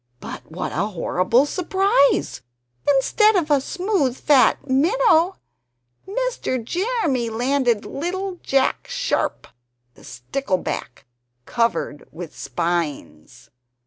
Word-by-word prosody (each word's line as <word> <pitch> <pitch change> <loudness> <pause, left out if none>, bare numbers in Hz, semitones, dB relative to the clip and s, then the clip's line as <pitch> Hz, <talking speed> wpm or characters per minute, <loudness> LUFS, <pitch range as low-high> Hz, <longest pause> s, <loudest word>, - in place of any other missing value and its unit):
But - - -9
what 175 +3 -4
a 190 +6 -1
horrible 205 - +1
surprise! 365 - +1 0.5
Instead 415 - +4
of 320 -5 +1
a 285 -2 +4
smooth 360 - -1
fat 265 -6 +3
minnow, 345 - +3 0.7
Mr. 425 - -2
Jeremy 335 - -1
landed 245 -1 0
little 365 +4 -4
Jack 270 -1 0
Sharp, - - -1 0.5
the - - -19
stickleback, 185 - -4 0.4
covered 230 -10 -1
with 165 0 -9
spines! 145 - -4
270 Hz, 95 wpm, -22 LUFS, -, 0.7 s, Instead